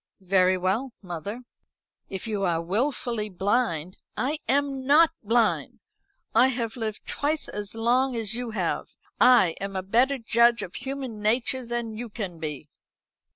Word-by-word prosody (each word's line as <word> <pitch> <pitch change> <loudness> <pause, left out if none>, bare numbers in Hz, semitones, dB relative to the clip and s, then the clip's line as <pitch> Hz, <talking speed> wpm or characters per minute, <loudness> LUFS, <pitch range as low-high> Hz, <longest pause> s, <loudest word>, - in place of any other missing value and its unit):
"Very 185 0 +4
well, 205 +8 -1
mother. 185 +6 -5 0.7
If 190 +2 -5
you 215 -3 -2
are 170 -3 +1
wilfully 220 - -1
blind 190 -3 0
" - - -39
"I 305 - -4
am 275 0 +1
not 315 +3 +6
blind. 225 +1 +1 0.5
I 240 +3 +6
have 235 -3 -2
lived 220 -3 -4
twice 300 +2 -1
as 210 +1 -5
long 245 +3 +2
as 225 -2 -1
you 245 0 -3
have. 220 - -2 0.2
I 245 -8 +7
am 195 0 -4
a 190 - -2
better 245 +8 +2
judge 235 0 +3
of 180 - -8
human 265 -4 -5
nature 240 +3 +1
than 235 -1 -3
you 235 +2 -5
can 195 -6 -6
be." 150 -2 -5
225 Hz, 155 wpm, -26 LUFS, 195-250 Hz, 0.7 s, I